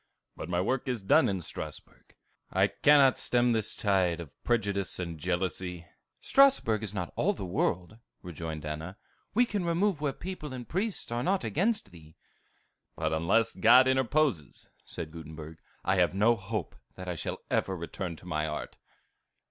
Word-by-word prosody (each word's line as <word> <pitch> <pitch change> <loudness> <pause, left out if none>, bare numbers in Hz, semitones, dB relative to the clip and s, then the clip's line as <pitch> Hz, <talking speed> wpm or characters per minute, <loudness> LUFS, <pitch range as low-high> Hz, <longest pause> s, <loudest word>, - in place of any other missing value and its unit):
"But 80 - -7
my 90 0 0
work 125 +9 -1
is 125 -6 -2
done 115 +5 +4
in 95 -2 -2
Strasbourg. - - -9 0.4
I - - +4
cannot 140 -3 +5
stem 120 0 +2
this 110 -2 -1
tide 95 -7 +1
of 80 -4 -8
prejudice 100 -5 0
and 85 -3 -5
jealousy." 90 0 -2 0.3
"Strasbourg 270 - +4
is 110 -3 -4
not 90 -4 -4
all - - +2
the 95 - -6
world," 90 +3 -1 0.2
rejoined 80 -3 -6
Anna. 80 +6 -5 0.4
"We 245 +2 +5
can 205 -5 -2
remove 170 0 +1
where 145 -2 +1
people 155 -3 -7
and 125 -2 -7
priests 195 - -2
are 120 0 -1
not 190 +6 +1
against 165 - 0
thee." 80 -2 -15 0.8
"But 80 0 -1
unless 95 +9 +2
God 125 +3 +6
interposes," 130 - +1 0.2
said 80 -2 -7
Gutenberg, 80 0 -9 0.3
"I 95 0 +2
have 90 0 +3
no 110 +4 +4
hope 105 -2 -4 0.2
that 95 0 -8
I 90 - -1
shall 85 - -4
ever 95 -1 0
return 85 +1 -5
to 85 - -15
my 75 -3 -1
art." 75 - -6
100 Hz, 165 wpm, -29 LUFS, 85-130 Hz, 0.8 s, God